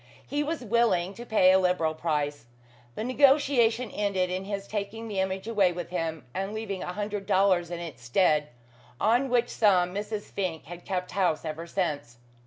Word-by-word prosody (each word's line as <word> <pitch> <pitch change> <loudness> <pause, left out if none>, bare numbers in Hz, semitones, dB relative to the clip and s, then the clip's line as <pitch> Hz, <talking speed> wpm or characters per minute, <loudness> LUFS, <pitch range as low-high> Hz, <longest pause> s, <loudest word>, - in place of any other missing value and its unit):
He 290 - -1
was 305 +1 -2
willing 200 -5 +2
to 240 +3 -10
pay 185 -4 +5
a 190 - +5
liberal 180 -4 +1
price. 150 -4 -2 0.5
The - - -3
negotiation 255 -3 +3
ended 190 -3 0
in 185 +1 -3
his 200 -1 -4
taking 215 +2 -4
the 205 -3 -3
image 190 +2 -2
away 205 -5 +3
with 175 0 -6
him, 160 -4 -3
and 195 +3 -3
leaving 200 -4 -4
a 180 - -4
hundred 205 -1 -4
dollars 185 -3 +3
in 175 -1 -5
its 160 -8 -8
stead; 150 +4 +2 0.5
on 245 +5 +2
which 245 -1 +2
sum 180 -4 +3
Mrs. 210 +1 -3
Fink 180 -5 -3
had 175 +2 -10
kept 180 -1 -3
house 180 -5 0
ever 160 +2 -5
since. 150 -10 -2
190 Hz, 180 wpm, -27 LUFS, 175-220 Hz, 0.5 s, pay